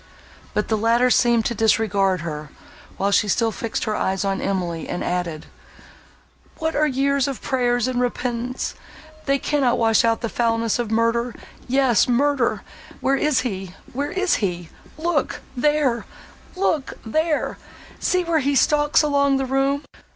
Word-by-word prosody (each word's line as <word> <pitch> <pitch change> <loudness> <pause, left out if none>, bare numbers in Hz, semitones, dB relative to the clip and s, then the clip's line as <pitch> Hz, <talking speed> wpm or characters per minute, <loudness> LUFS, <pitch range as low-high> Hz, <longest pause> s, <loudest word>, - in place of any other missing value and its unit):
But 210 - 0
the 220 -1 0
latter 235 +3 +3
seemed 235 -3 +3
to - - 0
disregard 205 -4 +2
her, 150 -2 -5 0.5
while 200 +1 0
she 210 - +3
still 225 +3 +1
fixed 225 +2 -3
her 215 - -1
eyes 190 +1 -1
on 195 0 -1
Emily, 175 -4 -2
and - - -3
added, 175 -3 -3 1.1
"What 320 0 -2
are 305 +1 +3
years 275 0 +1
of 275 -3 -4
prayers 245 -2 0
and 250 -1 -1
repentance? 245 0 -2 0.5
they 275 0 +3
cannot 275 -3 +1
wash 225 -2 +3
out 230 -1 +1
the 230 - -1
foulness 230 0 0
of 235 -3 -2
murder!—Yes, 235 +2 +1
murder! 260 0 +1 0.4
Where 270 - +2
is 295 +1 +2
he—where 200 +5 -5
is 380 -1 +1
he?—Look 210 - -3 0.2
there—look 295 +4 -1
there!—see 315 - -2
where 335 -2 +1
he 280 0 0
stalks 295 +3 +3
along 280 -2 +2
the 270 - -1
room! 270 +2 0
245 Hz, 135 wpm, -22 LUFS, 220-280 Hz, 1.1 s, latter